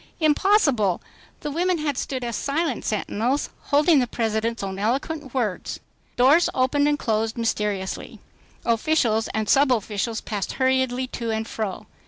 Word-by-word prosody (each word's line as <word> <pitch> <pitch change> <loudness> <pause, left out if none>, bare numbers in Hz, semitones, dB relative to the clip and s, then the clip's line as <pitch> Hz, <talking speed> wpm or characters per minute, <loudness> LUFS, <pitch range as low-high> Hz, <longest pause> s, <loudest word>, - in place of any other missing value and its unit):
Impossible! 295 - +3 0.4
The 295 - -3
women 355 +4 +1
had 300 -3 -1
stood 260 0 -3
as 235 -2 -3
silent 285 0 -1
sentinels 230 +5 -1
holding 295 +2 +4
the 250 - +1
President's 225 -1 -1
own 190 0 -4
eloquent 270 +5 -2
words. 215 -8 -2 0.4
Doors 280 +8 +5
opened 275 +3 +2
and 295 0 +2
closed 225 -2 -1
mysteriously. 210 -4 -2 0.5
Officials 230 -2 +2
and 220 0 -2
subofficials 230 -5 +1
passed 205 -3 -3
hurriedly 260 -1 +1
to 235 -2 -5
and 220 0 -2
fro. 215 -4 -4
245 Hz, 135 wpm, -24 LUFS, 220-290 Hz, 0.5 s, Doors